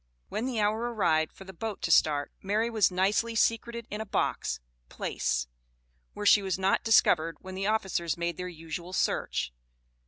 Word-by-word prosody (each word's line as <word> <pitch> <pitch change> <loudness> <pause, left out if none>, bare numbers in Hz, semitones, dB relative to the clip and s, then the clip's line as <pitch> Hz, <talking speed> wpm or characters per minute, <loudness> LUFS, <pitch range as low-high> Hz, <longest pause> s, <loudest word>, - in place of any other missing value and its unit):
When 230 +4 -2
the 245 -4 -2
hour 220 +3 +1
arrived 160 -8 +2
for - - -13
the 190 0 -11
boat 215 +3 -5
to 165 - 0
start, 145 -3 +3
Mary 215 +4 0
was 220 -3 +4
nicely 200 +5 +1
secreted 235 +1 +1
in 210 +1 -3
a - - -4
box - - -1 0.3
(place), - - -1 0.7
where 205 - -4
she 205 +1 +7
was 190 -3 -1
not 190 +1 +2
discovered 165 -7 +4
when 185 0 -8
the 195 +1 -2
officers 190 -7 0
made 170 0 -2
their 180 - -4
usual 170 +1 -7
search. 60 - 0
190 Hz, 175 wpm, -29 LUFS, 170-220 Hz, 0.7 s, she